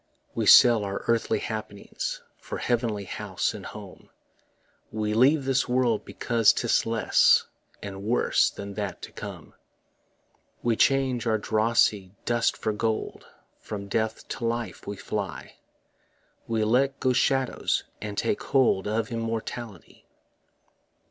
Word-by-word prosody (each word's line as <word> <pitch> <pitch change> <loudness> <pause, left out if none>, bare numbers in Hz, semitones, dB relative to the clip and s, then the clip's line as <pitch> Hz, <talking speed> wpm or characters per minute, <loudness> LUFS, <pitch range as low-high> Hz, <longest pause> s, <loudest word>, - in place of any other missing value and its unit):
We - - -1
sell 115 -3 +8
our 100 0 -4
earthly 115 -1 +1
happiness 105 -2 -5 0.2
For - - -6
heavenly 115 -4 -1
house 95 - -3
and - - -8
home; - - -11 0.8
We 105 -1 -2
leave 135 +5 +4
this 130 -1 +1
world 125 -3 +1
because 115 -3 +3
'tis 120 - +1
less 115 -1 +4 0.4
And 100 -1 -7
worse 115 +4 +2
than 100 0 -8
that 100 -2 -5
to - - -8
come. - - -9 1.1
We 120 -1 +2
change 130 -2 +2
our 110 -1 +2
drossy 110 -3 +1
dust 120 -1 +1
for 110 - -2
gold, 110 +1 -3 0.3
From 100 -1 -7
death 110 +2 -2
to - - -5
life 115 -5 -3
we 100 - -5
fly; 100 -1 -5 0.9
We 115 -1 0
let 130 +5 +2
go 130 -1 +2
shadows, 130 +1 +1 0.2
and 105 -1 -6
take 210 - 0
hold 130 -8 +2
Of 110 +1 -1
immortality. 115 -3 -5
115 Hz, 130 wpm, -26 LUFS, 105-120 Hz, 1.1 s, sell